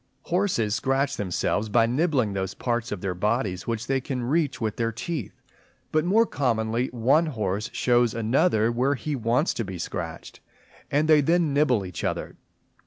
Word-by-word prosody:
Horses 175 - 0
scratch 135 +5 0
themselves 105 +2 -1
by 115 +2 +4
nibbling 130 - +1
those 95 0 -3
parts 120 -1 -2
of 105 -4 -4
their 95 -2 -2
bodies 105 0 -1
which 115 0 -2
they 135 0 0
can 125 -1 -3
reach 145 +2 0
with 110 -2 -2
their 115 -1 0
teeth; 130 - -5 0.5
but 155 0 +2
more 210 +7 +4
commonly 120 - 0
one 130 +8 +2
horse 105 -6 -2
shows 120 -2 +2
another 115 0 +2
where 130 +4 +1
he 145 +3 -3
wants 125 +6 +1
to 115 - -2
be 95 -3 -6
scratched, 85 -1 -6 0.5
and 150 +2 +1
they 155 -2 +6
then 165 0 +2
nibble 130 -8 +2
each 90 -3 -7
other. - - -3
120 Hz, 170 wpm, -25 LUFS, 110-145 Hz, 0.5 s, they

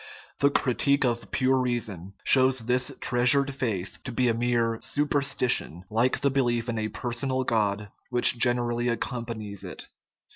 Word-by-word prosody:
The 140 - +4
"critique 140 +1 +1
of 120 -1 -2
pure 130 0 +1
reason" 110 -7 -3
shows 130 -1 +4
this 125 +1 0
treasured 130 +3 +3
faith 110 -9 -3
to 130 - -6
be 125 +1 +1
a - - +2
mere 115 -1 0
superstition, 140 - 0
like 115 +4 +1
the 140 - +2
belief 120 -3 0
in 115 -1 -2
a 110 - -1
personal 130 +4 -2
God 105 -3 -1 0.2
which 120 0 +4
generally 120 -1 +1
accompanies 115 -4 -4
it. - - -9
120 Hz, 145 wpm, -26 LUFS, 115-130 Hz, 0.2 s, The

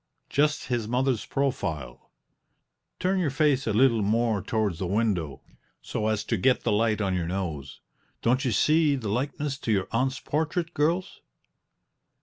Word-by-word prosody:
Just 150 +1 +1
his 120 -4 -2
mother's 125 0 0
profile 95 - -3 0.9
(turn 190 +1 +1
your 170 -5 +1
face 140 -2 +1
a - - +2
leetle 115 +1 +4
more 110 0 +1
towards 105 -5 -1
the 95 - -2
window, 95 - -1 0.4
so 110 - -3
as 110 -1 0
to 115 +1 -1
get 125 +7 +2
the - - +1
light 110 +1 +2
on 95 -2 0
your 90 -2 -1
nose). 85 -7 -4 0.4
Don't 125 +4 +2
you 130 - 0
see 150 +6 +3
the 115 -6 -4
likeness 135 +4 -2
to 115 - -2
your 95 -3 +1
aunt's 130 +4 0
portrait, 160 +3 -2
girls?" 165 +5 0
115 Hz, 155 wpm, -26 LUFS, 100-140 Hz, 0.9 s, leetle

